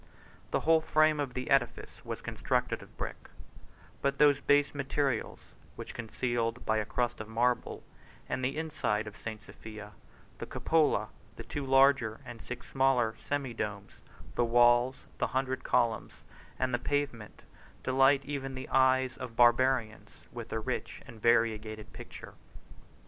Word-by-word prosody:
The - - 0
whole 160 0 +4
frame 155 -1 +3
of 135 -3 -3
the 130 0 -4
edifice 135 -3 0
was - - -6
constructed - - -1
of - - -16
brick; - - -6 0.7
but 140 0 0
those 145 -2 +5
base 145 0 +3
materials 140 -3 -1 0.4
were - - -6
concealed 115 0 -3
by 110 - +2
a 105 - 0
crust 120 -1 -1
of 110 - -7
marble; 120 +2 0 0.4
and 130 - -3
the 135 +4 -1
inside 130 -9 -1
of 105 -1 -9
St. 110 -2 -7
Sophia, 105 -2 -10 0.5
the - - -5
cupola, 160 -2 +1 0.3
the - - -8
two 145 - -5
larger, 135 -4 +4
and 120 -1 -9
the - - -12
six 125 0 -7
smaller, 130 -4 +2
semi 140 -4 -3
domes, 105 -2 -4 0.4
the 120 - +1
walls, 120 +2 +4 0.2
the 125 - +1
hundred 130 -1 -1
columns, 115 -2 +1 0.4
and 130 -1 -1
the 120 - +1
pavement, 135 -6 -3 0.4
delight 135 +1 +4
even 135 -2 -4
the 130 0 -7
eyes 130 -1 +3
of 125 -3 -7
Barbarians, 120 -1 +3 0.2
with - - -8
a - - -1
rich - - -4
and 115 -2 -13
variegated 110 -2 +1
picture. - - -10
125 Hz, 150 wpm, -31 LUFS, 115-135 Hz, 0.7 s, those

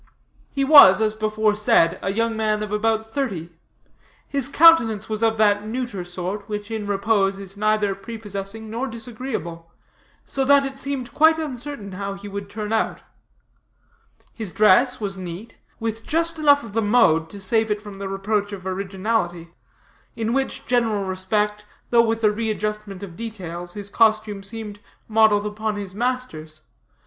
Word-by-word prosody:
He 275 - -1
was, 270 -10 +9
as 215 -1 +1
before 215 0 0
said, 210 -5 +3
a 195 - -1
young 230 +2 0
man 215 -1 0
of 210 - -6
about 220 +1 0
thirty. 195 - -3 0.8
His 275 -2 -1
countenance 265 -10 +5
of 225 -1 +2
that 205 -1 +3
neuter 235 -5 -4
sort, 185 +4 -5
which, 210 +1 -5
in 215 -2 -4
repose, 200 -1 +1
is 195 0 -8
neither 215 -1 +1
prepossessing 205 0 -7
nor 235 +5 -3
disagreeable; 225 -8 -6 0.5
so 270 - -1
that 280 +1 +5
it 270 0 -6
seemed 275 -3 -3
quite 320 +1 +5
uncertain 270 -7 -6
how 200 +1 -5
he 200 +1 -10
would 200 0 -6
turn 210 +1 -4
out. 225 - -1 1.3
His 220 -6 -6
dress 215 +7 +4
was 195 -3 -3
neat, 185 +5 -8 0.2
with 225 0 -3
just 330 +1 -1
enough 285 -2 +5
of 225 -3 -10
the 225 - +1
mode 205 -8 +3
to 200 - -10
save 220 +3 +1
it 210 0 0
from 205 -2 -11
the 195 -1 -4
reproach 205 +1 -1
of 190 -2 -8
originality; 190 -2 -2 0.6
in 225 0 -2
which 270 +1 -2
general 230 -5 +1
respect, 210 +3 -1 0.3
though 235 -1 +6
with 225 0 -1
a 210 - +5
readjustment 210 -2 -3
of 175 -4 -8
details, 175 -6 -7
his 205 -1 -6
costume 215 -1 +2
seemed 210 0 -7 0.3
modeled 215 -2 +4
upon 215 +1 -3
his 200 -2 -6
master's. 210 -10 -4
215 Hz, 155 wpm, -22 LUFS, 195-230 Hz, 1.3 s, was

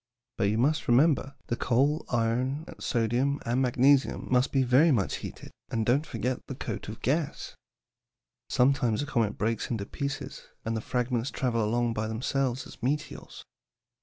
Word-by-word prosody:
"But 115 - +1
you 105 +2 +1
must 145 +6 +1
remember 140 +2 +3
the 120 - -1
coal, 140 +7 +1
iron, 125 +5 0
sodium, 125 +5 0
and 120 +3 +1
magnesium 135 +2 +3
must 125 +1 +3
be 135 -1 +3
very 130 +6 +5
much 110 -8 +1
heated, - - -9 0.2
and 115 -1 -1
don't 135 +7 +2
forget 125 +1 -2
the 135 - -5
coat 115 -5 -5
of 110 - -9
gas. 150 +2 -1 1.0
Sometimes 125 -2 +2
a - - -3
comet 115 -7 0
breaks 115 +1 -1
into 110 -4 -2
pieces, 140 +4 -5 0.2
and 115 0 -1
the 110 - -2
fragments 125 0 -1
travel 120 -4 0
along 120 +2 +1
by 110 0 -2
themselves 130 +3 -1
as - - -13
meteors." 145 +5 -3
125 Hz, 160 wpm, -28 LUFS, 115-140 Hz, 1.0 s, very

